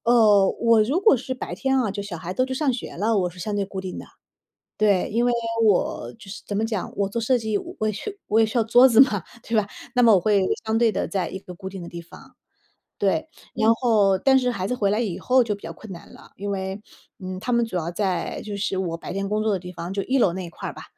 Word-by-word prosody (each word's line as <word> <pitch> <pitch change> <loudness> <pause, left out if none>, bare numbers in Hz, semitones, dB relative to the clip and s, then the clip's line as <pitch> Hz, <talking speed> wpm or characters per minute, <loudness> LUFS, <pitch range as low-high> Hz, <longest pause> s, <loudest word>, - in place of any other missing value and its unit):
呃， 215 -5 +5
我 230 -2 +5
如 280 - 0
果 400 - +5
是 260 +2 -4
白 - - -6
天 265 0 0
啊， 215 -5 0
就 200 0 -4
小 195 -4 -6
孩 175 +3 -5
都 255 - +2
去 260 - -4
上 280 -1 +1
学 240 - -6
了， 215 +3 +1
我 180 -1 0
是 180 - -16
相 205 +4 -3
对 200 - 0
固 190 -1 -6
定 185 -1 -6
的。 - - -9 0.7
对， 205 -4 +2
因 235 +2 +1
为 245 - +2 0.3
我 205 -4 +1
就 200 -4 -13
是 - - -8
怎 205 - -3
么 215 - 0
讲， 215 -4 -4
我 200 -1 0
做 235 - -2
设 245 +2 +2
计 220 -2 -1 0.2
我 215 - 0
也 - - +1
需 410 - -7
我 220 +2 +3
也 225 - +5
需 235 +3 -3
要 225 - +4
桌 245 +4 +6
子 230 -1 +4
嘛， 210 -10 +3 0.2
对 230 - -3
吧？ 205 -1 +1 0.3
那 245 - +4
么 225 -2 +7
我 190 - +5
会 200 0 +2 0.2
相 220 +1 +1
对 230 -2 +3
地 - - -2
在 190 -2 -2
一 190 - -6
个 180 -2 -11
固 190 - -8
定 190 -1 -8
的 170 - -8
地 170 - -7
方， 170 - -16 0.6
对。 205 +11 +1 0.3
然 225 0 +4
后 215 -6 +2
但 265 +6 +4
是 250 -1 +1
孩 190 -4 -3
子 250 - -1
回 200 -5 +1
来 215 - +1
以 205 -7 -2
后 255 0 +3
就 210 -3 -2
比 200 - -18
较 165 0 -6
困 210 +3 -12
难 170 - -11
了， - - -16
因 200 +1 -4
为， 190 +1 -4 0.4
嗯， 185 -1 -6
他 245 - -3
们 235 -1 +3
主 225 - -7
要 165 0 -2
在 185 -2 -2
就 205 -1 -5
是 195 -1 -2
我 175 -3 -2
白 - - -8
天 195 0 -2
工 210 +1 0
作 215 -1 +1
的 195 - +1
地 180 0 -9
方， 170 +2 -6
就 195 0 -2
一 265 +5 +1
楼 185 -7 +3
那 185 -1 -5
一 - - -8
块 - - -6
儿 - - -8
吧， - - -9
210 Hz, 305 characters per minute, -23 LUFS, 190-235 Hz, 0.7 s, 么